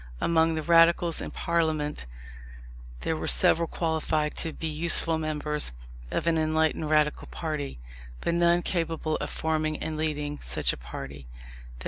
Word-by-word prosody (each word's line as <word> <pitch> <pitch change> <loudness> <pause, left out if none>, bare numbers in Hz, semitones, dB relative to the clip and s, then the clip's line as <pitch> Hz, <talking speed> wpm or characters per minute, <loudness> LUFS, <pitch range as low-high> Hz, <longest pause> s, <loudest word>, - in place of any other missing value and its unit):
Among 165 -1 +2
the 155 - -3
Radicals 170 0 +4
in - - -5
Parliament 155 - -1 0.9
there 160 - -1
were - - -4
several 170 0 +4
qualified 160 -2 -1
to 165 - -2
be 160 - -7
useful 160 +1 +5
members 150 - -2 0.4
of - - -2
an 165 -1 +2
enlightened 155 0 0
Radical 150 -1 +1
party, 150 - -5 0.4
but 170 - -1
none 170 0 +3
capable 165 -2 -2
of - - -5
forming 155 -1 -1
and 155 0 -5
leading 150 -2 -3
such - - -1
a - - -5
party. 65 +2 -9
160 Hz, 140 wpm, -27 LUFS, 150-165 Hz, 0.9 s, useful